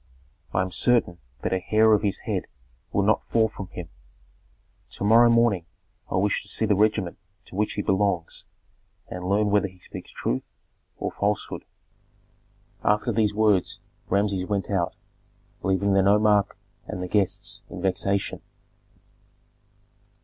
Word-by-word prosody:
I 95 - +1
am 95 - -5
certain 115 -6 +2 0.2
that - - 0
a 95 - +1
hair 110 +3 +4
of 105 - +3
his 100 -2 0
head - - -1 0.5
will 100 - +1
not 105 +2 +2
fall 110 -1 +3
from 100 -3 -8
him. 90 -2 -8 1.0
To - - -6
morrow 115 +3 +6
morning 115 -7 +3 0.4
I - - -2
wish 100 +2 +1
to - - -12
see 110 - 0
the 105 - +3
regiment 105 -3 +1 0.3
to - - -12
which 105 +2 0
he 105 - -2
belongs 95 -3 0 0.6
and 90 - -6
learn 105 +1 +2
whether 100 -1 +3
he 95 -1 -16
speaks 90 - -9
truth 65 - -2 0.5
or - - -3
falsehood." 105 0 -2 1.2
After 105 +1 +2
these 105 -2 +1
words 105 -4 +2 0.3
Rameses 100 -2 +1
went 100 -2 -2
out, 90 -2 0 0.7
leaving 95 +1 +1
the 95 - +5
nomarch 105 +1 +4 0.4
and 90 - -4
the - - -3
guests 100 0 0
in - - -7
vexation. 95 +1 0
100 Hz, 145 wpm, -25 LUFS, 95-105 Hz, 1.2 s, morrow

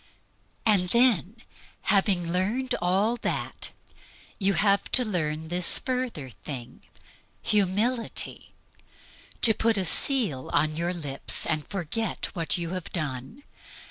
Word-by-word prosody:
And 195 -5 +3
then, 235 -4 +3 0.5
after - - +2
having 190 -4 +2
learned 235 +8 0
all 195 +7 +1
that, - - -3 0.7
you 195 -1 +1
have 200 -1 +2
to 250 - +5
learn 160 -5 -2
this 175 0 +6
further 250 - -3
thing, 125 -2 -8 0.6
Humility 210 +4 -1 0.9
to 225 - +8
put 225 0 +1
a 190 - 0
seal 185 - +2
upon 155 +1 +1
your 170 +2 -1
lips 150 -6 -1
and 155 -3 -2
forget 200 +5 -3
what 165 -2 0
you 170 -1 -4
have 185 -2 -5
done. 150 - -5
185 Hz, 120 wpm, -26 LUFS, 160-220 Hz, 0.9 s, to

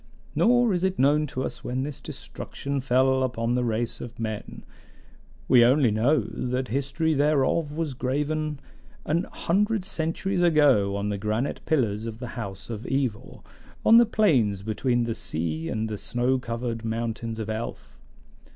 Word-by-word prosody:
Nor 245 -2 +4
is 180 0 -1
it 190 0 +1
known 150 +3 +3
to 130 -1 -4
us - - -5
when 130 +1 -2
this 145 0 -5
destruction 140 +1 -5
fell 130 +1 +3
upon 120 -2 0
the 125 0 +1
race 115 0 -1
of 120 - -9
men; 110 -2 -5 0.8
we 125 -2 +7
only 125 0 +4
know 125 +7 +3
that 125 +4 -3
the 115 - -12
history 140 +5 0
thereof 145 +1 +2
was 155 -2 -2
graven 150 +3 -2 0.5
an 170 +5 +1
hundred 210 +3 0
centuries 175 +2 -1
ago 145 - +4
on 100 +1 -2
the 100 -1 -2
granite 110 +6 -2
pillars 115 -7 +1
of 110 -1 -6
the 125 0 -6
House 100 -6 -7
of 110 +1 -6
Evor, 130 -6 -2 0.4
on 225 - +8
the 235 -1 +6
plains 125 - +2
between 120 +3 0
the 115 -1 -1
sea 80 -3 -3
and 110 0 -1
the 105 -2 -5
snow 125 +2 0
covered 115 -1 -4
mountains 115 0 -3
of 110 -2 -4
Elf. 110 +2 -6
125 Hz, 160 wpm, -26 LUFS, 115-150 Hz, 0.8 s, on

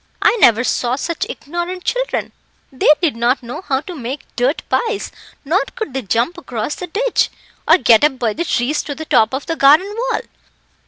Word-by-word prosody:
I - - +4
never 230 +1 +6
saw 245 0 0
such 325 +4 -3
ignorant 345 +4 -5
children; - - -2 0.4
they 265 - +1
did 305 -8 +2
not 240 +3 +1
know 240 +8 -6
how 270 -7 -1
to 360 - -8
make 270 -1 -6
dirt 255 +6 0
pies, 450 -3 -1 0.3
nor 345 +8 +2
could 440 - -5
they 265 - -2
jump 235 - -1
across 245 -3 -4
the 360 - -6
ditch, 460 +8 +1 0.4
or - - +7
get 235 -7 +5
up 295 -3 +3
by 230 -4 0
the 335 - -2
trees 295 -1 0
to 285 - -6
the 315 - -7
top 220 -6 +3
of 265 +1 -4
the 330 - -2
garden 320 +9 +4
wall. - - 0
285 Hz, 195 wpm, -18 LUFS, 245-350 Hz, 0.4 s, or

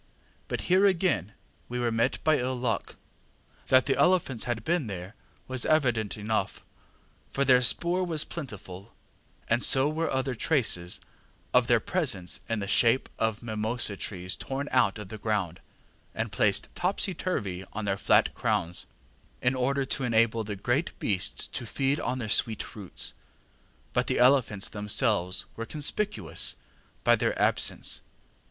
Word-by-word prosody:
But - - -3
here 190 +3 +4
again 170 - 0 0.4
we 125 0 -3
were 120 -1 0
met 115 0 +1
by 155 -1 +3
ill 130 +1 -1
luck. 120 -2 -2 0.7
That 130 -1 +5
the 135 - +1
elephants 140 -4 +2
had 120 -3 -3
been 165 -2 0
there 95 0 -7 0.3
was 130 -1 -3
evident 120 -10 +1
enough, 110 +1 -2 0.6
for 140 - 0
their 125 -1 +5
spoor 175 +8 +2
was 165 -4 +2
plentiful, 100 - -9 0.5
and 120 +2 +2
so 135 +1 +8
were 160 +2 -1
other 130 0 -1
traces 110 - +1 0.5
of - - +4
their - - +4
presence 90 -2 0
in 115 -2 -1
the 100 - -4
shape 115 +5 +2
of 110 0 -1
mimosa 110 -1 -1
trees 90 -2 -4
torn 135 +2 -5
out 120 -5 +3
of 105 -3 -8
the 110 - -8
ground, 100 -6 -2 0.6
and 115 -1 -2
placed 105 -1 0
topsy 190 +1 -1
turvy 100 - -3
on 110 0 -5
their 100 -1 0
flat - - +3
crowns, 100 -7 -2 0.5
in 125 - +1
order 135 +2 0
to 135 +1 -3
enable 115 -1 +2
the 105 -1 -5
great 120 - -1
beasts 95 -4 -1
to - - -5
feed 135 +5 -1
on 125 -1 -2
their 120 -4 -4
sweet 110 0 -1
roots; 100 -5 -2 0.8
but - - +1
the - - 0
elephants 125 -6 +3
themselves 105 -3 0
were 115 - -5
conspicuous 200 +8 -1 0.5
by - - +5
their - - -1
absence. - - +2
120 Hz, 150 wpm, -28 LUFS, 105-135 Hz, 0.8 s, so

